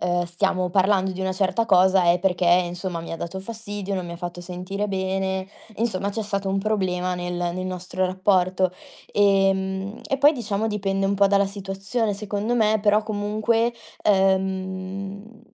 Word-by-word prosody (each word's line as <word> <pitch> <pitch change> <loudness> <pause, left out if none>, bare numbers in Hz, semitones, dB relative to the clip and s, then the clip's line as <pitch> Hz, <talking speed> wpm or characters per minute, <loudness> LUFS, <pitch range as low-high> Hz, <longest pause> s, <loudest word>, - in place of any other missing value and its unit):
ehm, 175 0 +1
stiamo 180 +1 0
parlando 190 +1 +2
di 185 0 -6
una 190 0 0
certa 200 +4 +1
cosa 190 -2 +5
è 170 +1 +4
perché, 180 -1 0
insomma, 175 0 +1
mi 165 - -7
ha - - -3
dato 170 +4 -5
fastidio, 205 -2 -5
non 185 - -2
mi 170 - -6
ha - - -6
fatto 175 0 -6
sentire 185 +3 -4
bene, 190 0 -1 0.3
insomma, 200 -3 -1
c'è 220 +2 -3
stato 200 -2 -2
un 195 - +1
problema 185 -3 0
nel 175 0 -4
nel 175 +1 -2
nostro 185 0 -3
rapporto. 185 0 +2 0.4
Ehm, 195 0 +2
e 270 - -1
poi 290 +2 +6
diciamo 220 -5 -2
dipende 195 -2 -1
un 200 - +1
po' 200 0 +4
dalla 200 0 +3
situazione 195 +3 -2
secondo 205 +3 -2
me, 220 -2 +3
però 210 +1 +3
comunque, 215 +2 0 0.3
ehm, 190 +2 -1
195 Hz, 165 wpm, -24 LUFS, 185-205 Hz, 0.4 s, poi